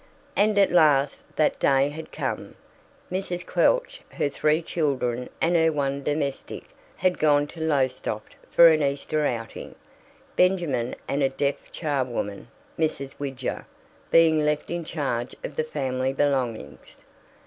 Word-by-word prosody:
And 210 0 +3
at 200 -1 +5
last 145 -5 +4
that 155 - +2
day 135 +1 +3
had 155 +2 -9
come. 130 -8 -4 0.6
Mrs. 180 -2 -3
Quelch, - - +1
her 145 - -1
three 155 +3 +1
children 130 -7 -1
and 170 +2 +2
her 160 -1 +4
one 140 -2 -1
domestic, 145 -1 -3 0.3
had 185 -1 0
gone 145 -1 +4
to 160 +2 -10
Lowestoft 130 -8 -1 0.2
for 170 -1 +8
an 155 -1 +3
Easter 145 +2 0
outing, 115 -1 -5 0.6
Benjamin 170 -10 +1
and 140 - -1
a 135 - +3
deaf 140 +1 -2
charwoman, 130 - -2 0.3
Mrs. 140 -4 -2
Widger, 135 -3 -4 0.4
being 160 -2 +5
left 150 +1 -1
in 170 0 -2
charge 135 -7 -3
of - - -6
the 155 - 0
family 135 -3 -2
belongings. 125 - -2
145 Hz, 135 wpm, -25 LUFS, 135-160 Hz, 0.6 s, for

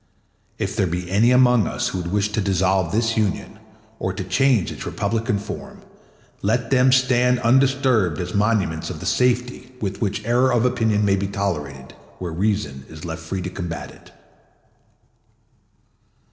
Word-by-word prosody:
If 95 +1 -3
there 100 -4 +1
be 90 +1 -4
any 110 +5 +4
among 125 -5 +4
us - - -2
who 95 - -4
would 85 -1 -4
wish 105 +1 0
to 105 - 0
dissolve 95 -2 +1
this 115 +1 +1
Union 105 -6 -2 0.4
or - - -2
to - - -4
change 110 +3 +2
its - - -7
republican 110 0 -1
form, 100 - -8 0.6
let 115 +4 0
them 130 0 +5
stand 125 -1 +3
undisturbed 130 - +2
as 90 0 -4
monuments 100 -6 0
of - - -6
the - - -7
safety 125 +1 0
with 100 -4 -4
which 105 0 -2
error 125 +3 +3
of 120 0 +2
opinion 110 -4 +1
may 100 -1 +3
be 100 +1 -2
tolerated 75 -10 -4 0.2
where 90 -2 -5
reason 90 -8 -1
is 80 +1 -10
left 80 0 -5
free 90 +3 -4
to 90 - -3
combat 85 -4 -5
it. - - -18
105 Hz, 160 wpm, -22 LUFS, 90-120 Hz, 0.6 s, them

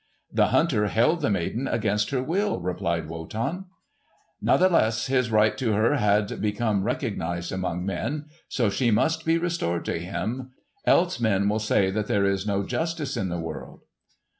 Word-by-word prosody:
"The - - +4
hunter 120 -11 +2
held 140 - +2
the 145 - +1
maid 95 -3 -1
against 105 -2 0
her 130 -2 -1
will," 195 +8 0
replied 85 -2 -2
Wotan. 110 - -4 0.8
"Nathless 115 -12 +3
his 130 -3 +1
right 110 -1 +3
to 115 -5 +1
her 115 +8 +3
had 105 -2 +1
become 105 -1 0
recognised 100 - -2
among 90 -1 -2
men. 140 +11 -3 0.2
So 115 -6 +1
she 120 +5 +1
must 115 +9 +1
be 165 +1 +3
restored 165 - -1
to - - -2
him, 110 +9 -4 0.3
else 180 +1 +3
men 100 -4 +2
will 105 +2 +1
say 100 -3 +2
that 105 +1 -2
there 100 -1 +2
is 100 +1 0
no 100 -1 0
justice 160 - -2
in 95 - -1
the 85 0 -3
world." 80 -5 -7
110 Hz, 165 wpm, -25 LUFS, 95-130 Hz, 0.8 s, The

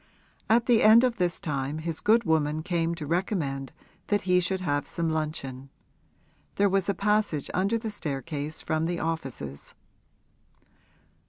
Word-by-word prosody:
At 230 +1 +4
the 240 -3 +4
end 220 +3 +7
of 245 -2 +1
this 175 -3 0
time 140 -1 -3
his 160 0 -3
good 230 +2 +4
woman 155 -1 +1
came 170 -1 0
to 160 -3 -6
recommend 150 - -2 0.4
that 205 -1 +1
he 180 -1 +3
should 185 +1 -1
have 145 -5 -1
some 165 -2 -1
luncheon; 140 -4 -4 0.9
there 200 - +3
was 195 0 +1
a 200 - +1
passage 210 -7 0
under 195 +5 +1
the 225 -1 -4
staircase 150 -3 -4
from 160 0 0
the 175 0 -2
offices. 135 - -5
165 Hz, 150 wpm, -27 LUFS, 150-200 Hz, 0.9 s, end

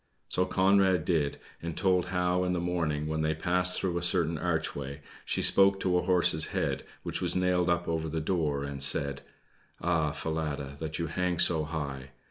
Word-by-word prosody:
So 90 - +1
Conrad 95 -2 +3
did, 80 -5 0 0.2
and 85 -1 -5
told 90 -2 +2
how, 90 0 0
in 90 0 0
the 90 - -1
morning, 85 -4 -1
when 80 0 -1
they 80 0 0
passed 90 +2 +1
through 85 -2 -1
a - - -7
certain 85 -2 +2
archway, 75 -4 -3 0.2
she - - -1
spoke 100 0 +5
to 90 -1 +1
a 90 - +3
horse's 85 -4 +2
head, - - -2 0.2
which - - -3
was 90 -1 +2
nailed 90 -1 +2
up 85 0 0
over 80 -1 -2
the 80 +1 -2
door, 75 -4 -1
and 70 -1 -5
said: 70 0 +2 0.6
"Ah, 80 -3 +1
Falada, 75 -3 -3
that 80 -1 -4
you 85 - -2
hang 90 +2 -1
so 80 -2 +2
high!" 70 -4 -5
85 Hz, 185 wpm, -29 LUFS, 75-90 Hz, 0.6 s, spoke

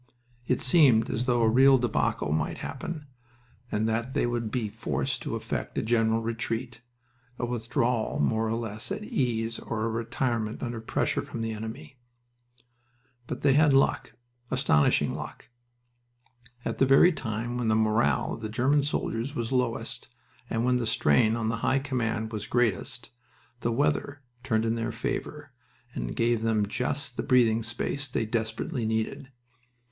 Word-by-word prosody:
It 125 - +1
seemed 130 -5 +5
as 120 +3 -2
though 120 -2 +3
a - - +5
real 135 +4 +6
debacle 120 - 0
might 75 -1 -1
happen, 155 -4 -6 0.7
and 110 +1 0
that 115 +3 -2
they - - +2
would 120 -2 -1
be 115 -1 -1
forced 75 - -2
to - - -3
effect - - -4
a - - +1
general 115 0 +2
retreat 115 +1 -3 0.6
a 120 - -1
withdrawal 120 0 -1
more 110 +10 +1
or 110 - 0
less 110 - -3
at 205 +1 -3
ease 115 - -1
or 110 -1 -3
a - - 0
retirement 115 -1 -2
under 120 -2 -4
pressure 115 - 0
from 115 - -6
the 115 - -2
enemy.... 120 +7 -7 1.3
But - - -5
they 140 -2 +5
had 145 -1 +5
luck 135 - +2 0.4
astonishing 130 - +2
luck. - - -8 1.2
At - - -3
the 135 - +4
very 135 +7 +7
time 120 -4 -3
when 120 - -1
the 110 - +3
morale 110 +1 +2
of - - -7
the 110 - -4
German 130 +6 +2
soldiers 140 -1 -2
was 115 -3 -2
lowest 125 -3 -1 0.4
and 115 +1 0
when 125 0 +3
the 120 -2 -1
strain 110 +2 +3
on 115 -1 -1
the 115 - -1
High 130 +4 +1
Command 120 -5 -2
was 105 -2 -4
greatest 120 0 0 0.5
the 120 - -1
weather 125 - 0 0.2
turned 110 -1 0
in 115 - +1
their 115 0 -2
favor - - -4 0.4
and - - -4
gave 115 -1 +2
them 110 -2 +2
just 125 +6 -3
the - - 0
breathing 120 -4 +3
space 120 +5 -3
they 125 -3 -1
desperately 115 +4 -2
needed. 110 +4 -2
115 Hz, 160 wpm, -28 LUFS, 110-125 Hz, 1.3 s, very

